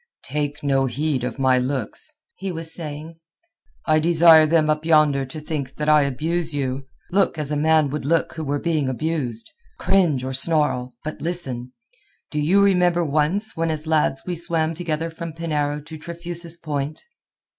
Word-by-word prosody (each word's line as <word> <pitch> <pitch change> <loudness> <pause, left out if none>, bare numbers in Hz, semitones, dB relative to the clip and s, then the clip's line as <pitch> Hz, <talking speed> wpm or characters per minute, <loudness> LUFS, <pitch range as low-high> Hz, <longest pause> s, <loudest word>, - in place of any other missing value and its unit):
"Take 145 +1 -3
no 135 -1 +2
heed 135 +1 -1
of 125 - -3
my 130 -2 +3
looks," 130 - -2 0.2
he 195 - -4
was 165 -1 -5
saying. 160 0 -7 0.7
"I 155 -1 +3
desire 165 -1 +6
them 155 -1 +3
up 155 0 0
yonder 155 -4 +3
to 135 +4 -8
think 145 -3 -5
that 150 - -3
I 150 0 +6
abuse 155 +4 -1
you. 135 -1 -3 0.2
Look 190 -3 +2
as 150 -1 -1
a - - 0
man 155 -1 +3
would 150 -2 -4 0.3
who 160 - -4
were 145 0 -1
being 155 -3 0
abused. 130 -4 -3 0.3
Cringe 170 - +2
or 130 0 -3
snarl, 135 -4 +1
but 155 - -6
listen. 130 -8 -2 0.6
Do 150 - -2
you 185 +7 +4
remember 180 -3 +3
once 155 +9 +1
when 165 0 0
as 155 0 -2
lads 155 -4 +1
we 180 - -2
swam 165 -1 0
together 165 -1 -3
from 165 0 -7
Penarrow 150 -3 -2
to 160 0 -9
Trefusis 170 0 -6
Point?" 150 -2 -4
155 Hz, 165 wpm, -22 LUFS, 140-165 Hz, 0.7 s, desire